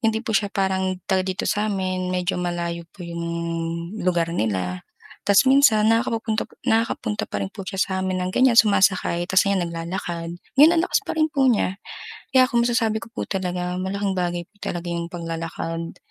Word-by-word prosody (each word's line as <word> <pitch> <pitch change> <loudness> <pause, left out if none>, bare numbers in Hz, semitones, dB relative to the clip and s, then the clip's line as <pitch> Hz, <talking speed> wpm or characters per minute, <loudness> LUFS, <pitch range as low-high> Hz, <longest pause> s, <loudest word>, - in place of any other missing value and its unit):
hindi 220 0 +2
po 220 -3 0
siya 200 0 -1
parang 190 -1 0
taga 190 -1 +2
dito 185 -1 -2
sa'min, 185 -3 -1
medyo 180 0 -1
malayo 170 -1 -3
po - - -19
yung 170 -1 -5 0.8
lugar 175 -2 +1
nila 90 -4 -2 0.4
ta's 200 +6 +5
minsan 235 -6 +5
nakakapu-punta 225 -1 +1
po - - -20 0.2
nakaka-punta 225 - 0
pa 100 - -4
rin 95 - -2
po 195 - -9
siya 190 0 -4
sa'min 190 -1 -1
ng 180 - -1
ganyan 245 +3 +6
sumasakay 190 -4 +2
ta's 190 +2 +3
ngayon 195 -3 +1
naglalakad. 170 0 -4 0.2
Ngayon 330 +3 +8
anlakas 335 +2 +2
pa - - -5
rin 310 -1 +2
po 270 -2 +3
niya. 200 -4 +1 0.5
Kaya 260 -1 +5
kung 240 -2 +1
masasabi 230 -2 +1
ko - - -10
po 230 - -5
talaga 180 -1 -3
malaking 195 +1 -1
bagay 175 -2 -2
po 185 - -46
talaga 175 0 -4
yung 170 0 -3
paglalakad. 165 -1 -5
185 Hz, 175 wpm, -23 LUFS, 175-220 Hz, 0.8 s, Ngayon